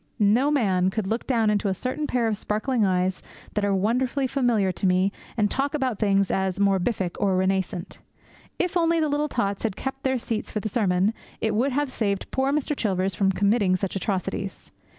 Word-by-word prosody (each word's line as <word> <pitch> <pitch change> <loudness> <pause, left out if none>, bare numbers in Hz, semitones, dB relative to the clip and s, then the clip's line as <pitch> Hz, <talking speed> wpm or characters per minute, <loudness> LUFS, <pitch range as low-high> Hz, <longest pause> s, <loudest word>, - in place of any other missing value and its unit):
No 225 +6 +3
man 190 -10 +2
could 215 +1 -2
look 225 +4 -2
down 225 -5 +2
into 205 0 0
a 190 - 0
certain 265 +8 -3
pair 240 -2 +1
of 220 - 0
sparkling 215 +4 -1
eyes 185 -1 +1 0.3
that 210 - -1
are 200 -1 +2
wonderfully 250 +7 +1
familiar 240 -7 +1
to 185 +2 -1
me 185 +2 +3 0.3
and 210 -2 +3
talk 280 +3 0
about 260 -7 -1
things 200 -2 +2
as 190 -1 0
'morbific' 195 -1 +1
or 195 -2 +2
'renascent.' 190 -1 -1 0.6
If 360 -1 -1
only 335 -1 +3
the 310 -1 +1
little 295 +1 0
tots 200 -6 -1
had 220 -4 -1
kept 270 0 -5
their 265 -1 +1
seats 225 -2 -3
for 215 - -2
the 215 - -3
sermon, 195 -1 +1 0.3
it 220 -1 0
would 250 +6 +1
have 285 0 0
saved 200 -5 -2
poor 265 +1 +1
Mr. 295 0 0
Chilvers 190 -5 0
from 195 +2 +2
committing 200 -1 +2
such 185 +1 -3
atrocities. 195 0 -3
210 Hz, 195 wpm, -25 LUFS, 195-255 Hz, 0.6 s, No